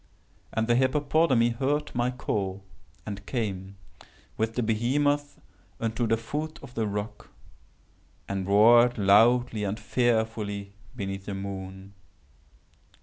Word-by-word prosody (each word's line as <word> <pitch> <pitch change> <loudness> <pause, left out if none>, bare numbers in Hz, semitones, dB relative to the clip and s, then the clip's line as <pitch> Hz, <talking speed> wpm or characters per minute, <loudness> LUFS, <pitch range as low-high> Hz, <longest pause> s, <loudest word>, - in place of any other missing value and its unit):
And 110 - 0
the 120 - +2
hippopotami 130 -1 +3
heard 135 +5 -1
my 120 +1 +1
call, 100 -6 -3 0.4
and 100 -1 -6
came, 100 -5 -3 0.6
with 110 +1 -2
the 125 - 0
behemoth, 145 +6 0 0.4
unto 115 +1 -1
the 115 +1 +2
foot 150 +7 -5
of 130 -2 -11
the 110 -2 -1
rock, 105 +1 -5 1.0
and 95 -1 -3
roared 120 +4 +6
loudly 110 +3 +4
and 100 +2 -2
fearfully 110 -4 -1 0.2
beneath 95 -3 -5
the 100 - -3
moon. 95 0 -7
110 Hz, 115 wpm, -27 LUFS, 100-125 Hz, 1.0 s, roared